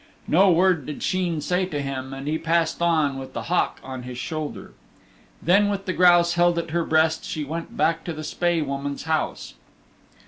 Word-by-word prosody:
No 190 +4 +5
word 175 -4 +3
did 150 - -6
Sheen 175 -4 0
say 180 +4 0
to 150 -5 -4
him 135 -1 -4
and 135 +1 -7
he 155 +1 0
passed 165 0 0
on 155 -5 +2
with 130 0 -9
the - - -4
hawk 180 - 0
on 130 -1 -6
his 125 0 -8
shoulder. 155 +3 -5 0.7
Then 200 +5 +4
with 195 -1 -3
the 185 - -1
grouse 175 -1 +5
held 175 0 +3
at 170 -1 -3
her 170 +1 +1
breast 160 0 +2
she 155 - -4
went 165 +4 -6
back 165 0 +1
to 170 - -3
the 155 0 -7
Spae 170 +2 0
Woman's 140 0 -4
house. 160 -1 -2
160 Hz, 195 wpm, -24 LUFS, 145-175 Hz, 0.7 s, No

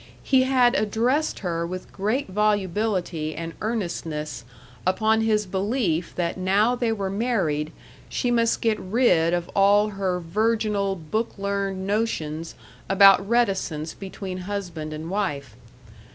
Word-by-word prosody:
He 260 -1 +4
had 250 -2 +4
addressed 250 +5 0
her 170 -3 -2
with 180 +2 -6
great 215 +8 -1
volubility 190 -5 0
and 165 +1 -5
earnestness 165 - -3 0.4
upon 220 +4 +2
his 215 -1 +2
belief 190 -3 -1
that 170 0 -1
now 200 +6 +3
they 240 -2 0
were 200 -3 -2
married, 190 -9 0 0.4
she 245 - -1
must 230 -1 +2
get 220 -2 +1
rid 185 -6 +2
of 175 0 -1
all 205 +1 +4
her 190 -3 -2
virginal 210 +2 0
book 200 +8 -3
learned 195 -1 -2
notions 165 -7 -2 0.3
about 195 0 +6
reticence 190 -9 0
between 190 -1 -7
husband 175 -7 -4
and 155 +1 -6
wife. 145 - -3
195 Hz, 125 wpm, -24 LUFS, 170-220 Hz, 0.4 s, about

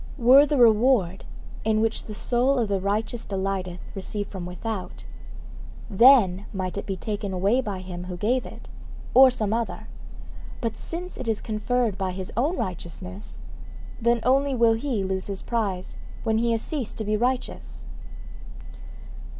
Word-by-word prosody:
Were 265 +3 +7
the 290 - 0
reward 220 -5 +4 0.4
in 220 0 +2
which 225 0 -1
the 215 - -7
soul 250 +5 +1
of 230 -4 0
the 200 -1 +1
righteous 215 +4 -2
delighteth 190 -2 -3
received 205 +1 -5
from 185 -3 -6
without, 190 +2 -6 0.9
then 205 -4 +5
might 185 -2 -3
it 200 - -5
be 195 - -2
taken 205 0 -4
away 200 +8 +2
by 200 -6 -4
him 180 -1 -7
who 180 -1 -6
gave 245 +7 +1
it, - - -11 0.5
or 265 +1 +9
some 215 -4 -1
other; 230 0 -3 0.7
but 230 -3 -2
since 355 +2 -7
it 255 - -5
is 220 -2 0
conferred 220 -1 -1
by 190 -1 -1
his 185 0 -6
own 295 +10 +1
righteousness, 185 +2 -6 0.6
then 235 0 +2
only 270 +2 +2
will 230 -2 +4
he 225 -3 -1
lose 190 0 -2
his 195 -1 -5
prize 200 -6 -2 0.3
when 220 -1 +1
he 235 0 +1
has 225 -1 0
ceased 275 -8 -4
to 220 - -3
be 215 0 0
righteous. 245 +3 -3
215 Hz, 160 wpm, -25 LUFS, 190-245 Hz, 0.9 s, or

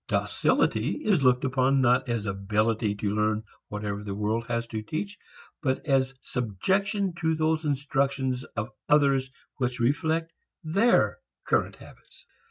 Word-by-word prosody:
Docility 305 - +1
is 195 -8 +3
looked 125 0 +3
upon 130 +1 +2
not 130 0 +3
as 115 -3 -1
ability 105 +2 0
to 100 0 -2
learn 110 0 +1 0.2
whatever 105 -1 -4
the 100 -2 -4
world 110 +3 -1
has 115 -1 -1
to 110 -1 -3
teach, 180 - -4 0.5
but 130 -1 -1
as 135 -2 +2
subjection 190 - -1
to 160 -1 +2
those 155 0 0
instructions 135 -2 0
of 110 +3 -3 0.2
others 140 -3 +4 0.3
which 125 -1 -1
reflect 160 +6 0 0.3
their 200 - +3 0.3
current - - +1
habits. - - -17
130 Hz, 135 wpm, -27 LUFS, 110-155 Hz, 0.5 s, others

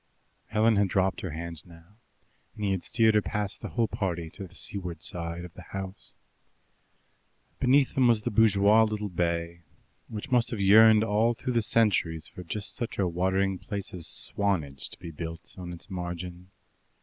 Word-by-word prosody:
Helen 110 0 +3
had 100 0 +3
dropped 95 +1 +1
her 90 - -4
hand 85 0 -6
now, 85 +4 -18 0.6
and 105 - -3
he 100 - +1
had 95 -2 -1
steered 110 +2 +3
her 105 - +4
past 105 -1 -2
the 110 - -5
whole 115 +7 +1
party 90 -8 -3
to 100 -2 -8
the 90 - -16
seaward 90 -4 -5
side 85 0 -4
of 90 - -12
the - - -11
house. 95 +2 -8 1.4
Beneath 135 +1 +4
them 130 -2 +4
was 115 -3 +3
the - - -1
bourgeois 105 0 +5
little 105 -1 0
bay, 85 -1 -2 0.5
which 110 +5 -7
must 120 -1 +3
have 115 - -4
yearned 110 +2 +7
all 115 +2 +2
through 125 +2 -3
the 120 - +3
centuries 100 -8 +1
for 90 - -10
just 100 +4 -3
such 120 -4 -4
a 95 - +2
watering 95 +2 0
place 100 -2 -5
as 85 -3 -6
Swanage 80 -10 -2
to - - -11
be 85 - -8
built 80 +1 -7
on 90 -2 -7
its 85 - -7
margin. 90 -1 -6
95 Hz, 180 wpm, -28 LUFS, 85-110 Hz, 1.4 s, yearned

